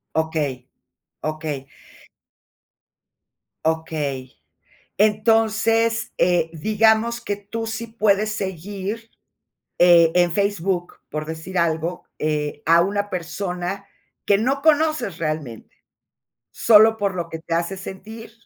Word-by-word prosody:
Okey. 150 -5 -1 0.6
Okey. 155 -3 -4 2.0
Okey. 150 -5 -2 0.6
Entonces, 225 +2 +2
eh, 175 -2 +2
digamos 220 +6 +2
que 205 - -3
tú 215 +3 -6
sí 225 +1 -4
puedes 215 -1 +1
seguir, 200 +3 -5 0.7
eh, 170 -2 +7
en 175 -1 +4
Facebook, 195 -3 -1
por 155 +1 -4
decir 160 +4 -6
algo, 165 +1 0 0.2
eh, 150 -1 -2
a 165 +1 +6
una 205 +2 -1
persona 180 +2 -4 0.4
que 200 - +4
no 265 +6 0
conoces 310 - +2
realmente. 155 -8 -4 0.8
Solo 220 0 +6
por 200 -3 -1
lo 170 -1 -3
que 160 - -6
te 165 +1 -5
hace 170 +3 -1
sentir. 220 +5 -9
190 Hz, 105 wpm, -22 LUFS, 160-220 Hz, 2.0 s, eh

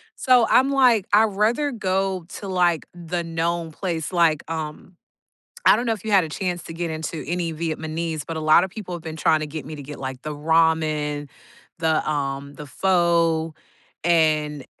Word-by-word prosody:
so 250 -3 +4
I'm 265 +2 +4
like, 250 -7 +4
"I'd 215 +2 +7
rather 220 +8 +1
go 190 -5 -1
to, 200 - -7
like, 175 -4 +1
the 175 0 -4
known 165 0 -2
place." 170 -3 -3
like, 165 -3 +3
um 160 +2 -6 0.7
I - - +8
don't 240 - -2
know 225 - +2
if 215 -1 -9
you 220 - -2
had 195 -3 +5
a - - -8
chance 180 +1 -3
to 165 - -8
get 170 -1 -3
into 160 0 -5
any 170 0 -2
Vietnamese, 160 -1 -3
but 165 -1 -4
a 160 - -3
lot 155 +3 +5
of 190 - -3
people 195 -3 -7
have 170 - -8
been 160 -1 -6
trying 155 - +3
to 155 - -3
get 150 -2 -7
me 155 - -7
to 145 - -8
get, 150 +1 -9
like, 130 -1 -5
the 150 -1 -4
ramen, 155 -2 +1 0.5
the, 160 -2 +1
um 140 -1 -3
the 150 0 -9
pho, 170 -1 +1 0.5
and 155 -4 +2
165 Hz, 190 wpm, -23 LUFS, 155-185 Hz, 0.7 s, I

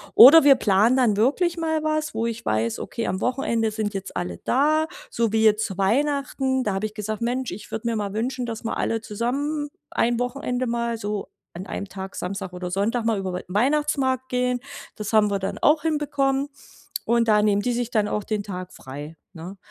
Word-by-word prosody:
Oder 290 +7 +10
wir 280 -1 +8
planen 220 +1 +3
dann 240 -5 +3
wirklich 295 - +2
mal 320 -1 0
was, 310 0 -1
wo 225 +1 -1
ich 230 -1 -4
weiß: 110 +1 0
„Okay, 230 - -4
am 185 +1 -2
Wochenende 230 -3 0
sind 215 -1 -3
jetzt 195 -1 -5
alle 90 -1 -4
da“, 305 +4 +2 0.2
so 230 -2 0
wie 220 0 +2
jetzt 215 0 +4
zu 190 -3 -6
Weihnachten. 265 +4 +1
Da 205 - 0
habe 195 +2 -1
ich 210 - -14
gesagt: 215 0 -4
„Mensch, 245 +2 -1
ich 190 +4 -9
würde 220 +1 -3
mir 230 - 0
mal 205 -2 -3
wünschen, 250 +3 -2
dass 230 -1 -5
wir - - -1
alle 225 - 0
zusammen 280 +8 -2 0.2
ein 235 0 +1
Wochenende 250 0 -2
mal 235 0 -1
so, 205 -2 -4 0.2
an 185 +3 -8
einem 200 - -5
Tag 190 0 -7
Samstag 190 0 -4
oder 180 0 -5
Sonntag 220 +5 0
mal, 225 -2 +2
über 190 -1 -3
We 180 - -5
Weihnachtsmarkt 260 +4 +1
gehen.“ 250 0 0 0.4
Das 210 +1 -5
haben 210 -1 +4
wir 200 - 0
dann 195 - -3
auch 300 +1 +3
hinbekommen. 290 -3 0 0.6
Und 235 -1 +2
da 210 -1 +5
nehmen 205 -1 +2
die 245 - 0
sich 240 -1 -2
dann 210 -2 +1
auch 210 - -2
den 210 -2 -2
Tag 185 -2 -7
frei, 145 +4 -9 0.2
ne? 180 +3 -9
230 Hz, 205 wpm, -24 LUFS, 200-260 Hz, 0.6 s, Oder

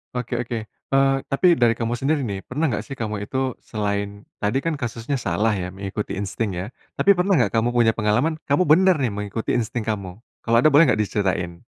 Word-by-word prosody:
Oke 125 0 -3
oke. 120 0 -4 0.3
Eee, 135 0 +4 0.2
tapi 170 +5 +4
dari 120 -4 +4
kamu 115 +1 -2
sendiri 140 +5 0
nih, 100 -2 -5
pernah 150 +6 -1
nggak 120 - -2
sih 135 - -8
kamu 110 -1 -2
itu 130 +3 -2
selain 100 -1 -3 0.2
tadi 105 +6 +1
kan 165 +2 -2
kasusnya 120 0 -3
salah 115 -3 0
ya 90 -1 -4
mengikuti 100 +2 -5
insting 100 +2 -2
ya, 95 - -4 0.3
tapi 200 0 +5
pernah 180 +2 +2
nggak 120 - +2
kamu 115 +2 +2
punya 120 -2 +3
pengalaman 115 +9 +1
kamu 145 +6 +2
bener 185 +3 +6
nih 130 - +1
mengikuti 105 +2 -2
insting 115 -1 -2
kamu? 100 -3 -4 0.2
Kalau 115 0 +3
ada, 125 - +5
boleh 150 +2 +6
nggak - - 0
diceritain? 90 -4 -2
115 Hz, 200 wpm, -22 LUFS, 105-135 Hz, 0.3 s, bener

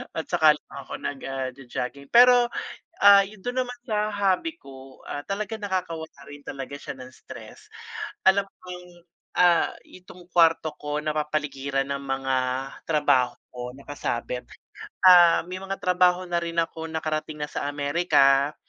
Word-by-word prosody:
at - - -3
saka - - +5
lang - - -21
ako - - -10
nag, 140 - -4
ah, 135 -1 -3
jo-jogging. 135 +1 -6
Pero, 245 0 +7 0.6
ah, 200 0 +9
yun 210 0 -14
dun 250 +1 -1
naman 245 0 -9
sa 215 -1 0
hobby 205 - 0
ko, 135 -1 -13
ah, 145 - -4
talaga 210 +2 -3
nakakawala 180 -6 -4
rin 145 0 -11
talaga 135 0 -6
siya - - -7
ng 125 - -9
stress, - - -13 0.6
alam 195 +1 +4 0.2
kong, 180 0 -9 0.5
ah, 175 -1 +4
itong 180 -1 -15
kwarto 165 -2 +4
ko 150 0 -3
napapaligiran 150 -3 -2
ng 140 - -1
mga 135 -1 -1 0.5
trabaho 145 -5 +2 0.2
ko 125 0 -7
nakasabit, 125 -3 -4 0.6
ah 175 -2 +8
may 185 - -5
mga 195 0 -4
trabaho 180 0 +2
na 175 -1 0
rin 170 0 -5
ako 165 -1 -2
nakarating 155 -1 -3
na 150 - -1
sa - - -3
America. 145 -1 +3
160 Hz, 150 wpm, -25 LUFS, 140-185 Hz, 0.6 s, ah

